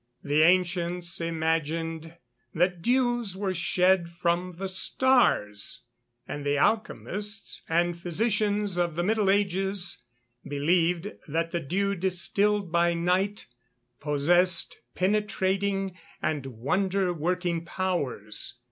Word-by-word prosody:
The 145 Hz, +2 st, +2 dB
ancients 175 Hz, 0 st, +1 dB
imagined 165 Hz, 0 st, -2 dB, 0.4 s
that 175 Hz, +1 st, +1 dB
dews 240 Hz, -4 st, +1 dB
were 195 Hz, -1 st, -1 dB
shed 180 Hz, 0 st, +2 dB
from 175 Hz, +1 st, -1 dB
the 195 Hz, +1 st, -3 dB
stars; 185 Hz, -, +2 dB, 0.4 s
and 145 Hz, -, -5 dB
the 145 Hz, 0 st, +1 dB
alchemists 210 Hz, +2 st, -1 dB
and 170 Hz, +1 st, +2 dB
physicians 205 Hz, +2 st, 0 dB
of 175 Hz, -2 st, 0 dB
the 175 Hz, -, 0 dB
middle 210 Hz, 0 st, +2 dB
ages 195 Hz, -1 st, 0 dB, 0.4 s
believed 170 Hz, +6 st, +1 dB, 0.2 s
that 165 Hz, +2 st, -1 dB
the 170 Hz, -, -1 dB
dew 195 Hz, +7 st, -1 dB
distilled 190 Hz, +1 st, +1 dB
by 170 Hz, 0 st, +2 dB
night 185 Hz, +4 st, 0 dB, 0.5 s
possessed 170 Hz, +5 st, +2 dB, 0.2 s
penetrating 195 Hz, -1 st, 0 dB, 0.2 s
and 145 Hz, -4 st, -2 dB
wonder 180 Hz, -, 0 dB
working 175 Hz, +1 st, -1 dB
powers. 140 Hz, -, -3 dB
180 Hz, 105 wpm, -27 LUFS, 165-195 Hz, 0.5 s, The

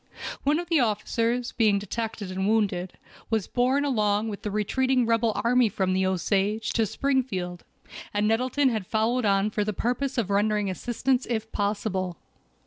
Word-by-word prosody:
One 290 Hz, +2 st, +3 dB
of 345 Hz, +1 st, -4 dB
the 330 Hz, -3 st, +3 dB
officers 230 Hz, +1 st, 0 dB
being 215 Hz, -3 st, +3 dB
detected 210 Hz, 0 st, -4 dB
and 190 Hz, +1 st, -1 dB
wounded, 195 Hz, -5 st, +1 dB, 0.4 s
was 220 Hz, -3 st, 0 dB
borne 260 Hz, +3 st, +1 dB
along 215 Hz, -4 st, +1 dB
with 205 Hz, -, -6 dB
the 210 Hz, -, -3 dB
retreating 250 Hz, +5 st, +1 dB
rebel 230 Hz, 0 st, +2 dB
army 245 Hz, -1 st, +4 dB
from 190 Hz, -1 st, 0 dB
the 190 Hz, 0 st, +2 dB
Osage 200 Hz, +3 st, 0 dB
to 225 Hz, -2 st, +2 dB
Springfield, 200 Hz, -11 st, -1 dB, 0.5 s
and 205 Hz, 0 st, +1 dB
Nettleton 255 Hz, +5 st, +2 dB
had 215 Hz, -6 st, -3 dB
followed 230 Hz, +2 st, +1 dB
on 200 Hz, +1 st, +2 dB
for 210 Hz, -, 0 dB
the 215 Hz, +1 st, -2 dB
purpose 250 Hz, +6 st, -1 dB
of 210 Hz, -4 st, 0 dB
rendering 205 Hz, 0 st, +1 dB
assistance 245 Hz, +5 st, -1 dB
if 220 Hz, -2 st, -2 dB
possible. 200 Hz, -3 st, -2 dB
220 Hz, 160 wpm, -26 LUFS, 200-245 Hz, 0.5 s, army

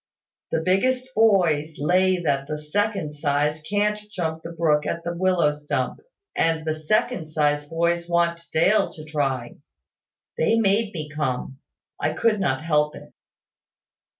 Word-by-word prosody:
The 160 Hz, -, 0 dB
biggest 255 Hz, +7 st, +1 dB
boys 175 Hz, -9 st, +3 dB
lay 185 Hz, +4 st, +2 dB
that 140 Hz, -4 st, 0 dB
the 150 Hz, -, -3 dB
second 160 Hz, 0 st, -1 dB
size 150 Hz, +1 st, 0 dB
can't 210 Hz, +5 st, 0 dB
jump 160 Hz, -5 st, -3 dB
the 165 Hz, -, -7 dB
brook 155 Hz, -3 st, +1 dB
at 170 Hz, -, -3 dB
the 170 Hz, -, -3 dB
willow 180 Hz, -4 st, +2 dB
stump; 145 Hz, -4 st, -3 dB, 0.4 s
and 160 Hz, -1 st, +1 dB
the 155 Hz, -, 0 dB
second 160 Hz, +4 st, 0 dB
size 150 Hz, -1 st, +1 dB
boys 170 Hz, +2 st, 0 dB
want 170 Hz, -1 st, +1 dB
Dale 170 Hz, +7 st, +3 dB
to 155 Hz, -, -10 dB
try. 135 Hz, -5 st, -2 dB, 0.8 s
They 190 Hz, +8 st, +3 dB
made 210 Hz, 0 st, +2 dB
me 155 Hz, -2 st, -4 dB
come. 135 Hz, -3 st, -3 dB, 0.4 s
I -, -, 0 dB
could 220 Hz, -3 st, +1 dB
not 140 Hz, -7 st, 0 dB
help 150 Hz, -2 st, +1 dB
it." -, -, -13 dB
160 Hz, 145 wpm, -24 LUFS, 150-185 Hz, 0.8 s, boys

